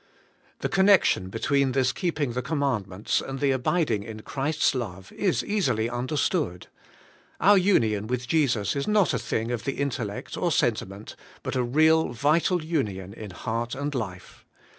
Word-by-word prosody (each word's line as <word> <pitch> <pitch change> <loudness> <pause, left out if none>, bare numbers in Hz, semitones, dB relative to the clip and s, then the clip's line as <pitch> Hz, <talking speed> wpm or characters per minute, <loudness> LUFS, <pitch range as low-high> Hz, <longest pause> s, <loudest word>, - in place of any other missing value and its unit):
' - - -35
The - - 0
connection 190 - +4
between 135 +5 +1
this 130 -1 +2
keeping 160 -7 -2
the 125 +2 -2
command 135 - -1
ments 95 +2 -1
and 135 0 -6
the 140 -1 +2
abiding 130 - +1
in 110 +1 -8
Christ's 150 +2 0
love 95 -8 -5
is 190 -3 0
easily 185 - 0
un 120 +1 -3
derstood. 150 - -1 0.8
Our 205 +5 +6
union 110 - +2
with 125 +1 -3
Jesus 135 - +1
is 140 - -2
not 210 -7 +3
a 125 - 0
thing 115 0 -2
of 120 -2 -3
the 135 - -2
intellect 125 -8 -3
or 175 - 0
sentiment, 110 -7 -1 0.3
but - - -3
a 130 - +2
real 155 +4 +3
vital 155 +7 +2
union 100 - -2
in 110 -1 -8
heart 115 +5 -3
and 145 +2 -3
life. 95 -8 -6
130 Hz, 165 wpm, -26 LUFS, 110-155 Hz, 0.8 s, Our